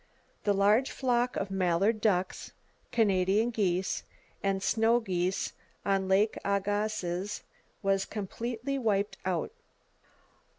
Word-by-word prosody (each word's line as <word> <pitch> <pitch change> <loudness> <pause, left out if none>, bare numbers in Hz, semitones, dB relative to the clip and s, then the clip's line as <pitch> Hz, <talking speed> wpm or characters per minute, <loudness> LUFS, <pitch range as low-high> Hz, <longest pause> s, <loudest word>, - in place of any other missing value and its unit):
The 205 - +4
large 210 +6 +4
flock 245 -1 0
of 195 0 -2
mallard 195 +4 +2
ducks, 190 -4 0 0.4
Canada 200 -1 +3
geese, 185 -4 0 0.4
and 195 -1 0
snow 225 +3 +3
geese 185 -3 -1 0.3
on 195 -1 +1
Lake 200 +3 +3
Agassiz 200 -1 -1 0.4
was 195 0 +2
completely 235 +6 -3
wiped 205 -4 0
out. 180 -3 -1
200 Hz, 100 wpm, -30 LUFS, 190-220 Hz, 0.4 s, The